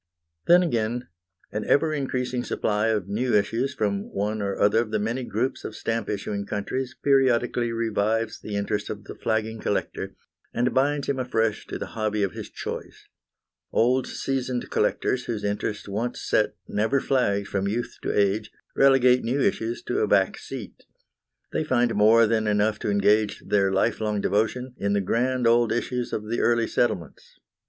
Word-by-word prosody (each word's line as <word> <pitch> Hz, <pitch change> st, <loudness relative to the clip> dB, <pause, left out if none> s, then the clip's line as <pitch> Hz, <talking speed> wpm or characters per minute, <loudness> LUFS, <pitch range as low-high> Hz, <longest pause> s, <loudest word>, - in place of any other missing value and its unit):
Then, 175 Hz, +1 st, +7 dB
again, 120 Hz, -5 st, -1 dB, 0.4 s
an -, -, -3 dB
ever 155 Hz, +2 st, +3 dB
increasing 130 Hz, -3 st, -2 dB
supply 105 Hz, -2 st, 0 dB
of 105 Hz, -4 st, 0 dB
new 115 Hz, +5 st, 0 dB
issues 115 Hz, +6 st, +1 dB
from 100 Hz, -2 st, -1 dB
one 105 Hz, +2 st, -2 dB
or 100 Hz, -1 st, -2 dB
other 105 Hz, +2 st, +4 dB
of 115 Hz, -1 st, -1 dB
the 110 Hz, -, 0 dB
many 115 Hz, +5 st, -2 dB
groups 120 Hz, +2 st, -2 dB
of 110 Hz, -, -6 dB
stamp 115 Hz, -2 st, -2 dB
issuing 100 Hz, 0 st, -3 dB
countries 125 Hz, +5 st, -3 dB
periodically 125 Hz, -3 st, +2 dB
revives 115 Hz, -1 st, 0 dB
the 105 Hz, -, -6 dB
interest 100 Hz, 0 st, -2 dB
of 105 Hz, -1 st, -6 dB
the -, -, -8 dB
flagging 110 Hz, 0 st, -2 dB
collector, 105 Hz, -, -3 dB, 0.4 s
and 120 Hz, +2 st, +1 dB
binds 140 Hz, +2 st, +1 dB
him 135 Hz, -2 st, -1 dB
afresh 115 Hz, -4 st, 0 dB
to -, -, -4 dB
the -, -, -4 dB
hobby 110 Hz, -1 st, 0 dB
of 95 Hz, -, 0 dB
his -, -, -7 dB
choice. -, -, -7 dB, 0.6 s
Old, 125 Hz, +3 st, +2 dB
seasoned 130 Hz, -2 st, -3 dB
collectors, 125 Hz, +4 st, 0 dB
whose 110 Hz, -3 st, -3 dB
interest 105 Hz, 0 st, -2 dB
once 110 Hz, +5 st, -3 dB
set -, -, +1 dB
never 110 Hz, +6 st, +1 dB
flags 100 Hz, -8 st, +1 dB
from 100 Hz, 0 st, -1 dB
youth 115 Hz, +4 st, -3 dB
to -, -, -1 dB
age, 105 Hz, +1 st, +1 dB, 0.2 s
relegate 130 Hz, -2 st, +5 dB
new 125 Hz, +5 st, 0 dB
issues 115 Hz, -3 st, 0 dB
to -, -, -1 dB
a -, -, +2 dB
back -, -, +3 dB
seat. -, -, -9 dB, 0.7 s
They -, -, 0 dB
find 120 Hz, -5 st, +2 dB
more 110 Hz, +3 st, +6 dB
than 110 Hz, 0 st, +1 dB
enough 105 Hz, +1 st, +2 dB
to -, -, -2 dB
engage 105 Hz, +1 st, +2 dB
their 100 Hz, -2 st, +2 dB
lifelong 105 Hz, +1 st, 0 dB
devotion 110 Hz, +6 st, 0 dB
in 100 Hz, 0 st, 0 dB
the 100 Hz, -, +2 dB
grand 125 Hz, +5 st, 0 dB
old 115 Hz, 0 st, +4 dB
issues 120 Hz, +1 st, -2 dB
of 105 Hz, 0 st, -3 dB
the 115 Hz, +2 st, -1 dB
early 115 Hz, -1 st, +3 dB
settlements. 85 Hz, -, -2 dB
115 Hz, 170 wpm, -25 LUFS, 105-125 Hz, 0.7 s, Then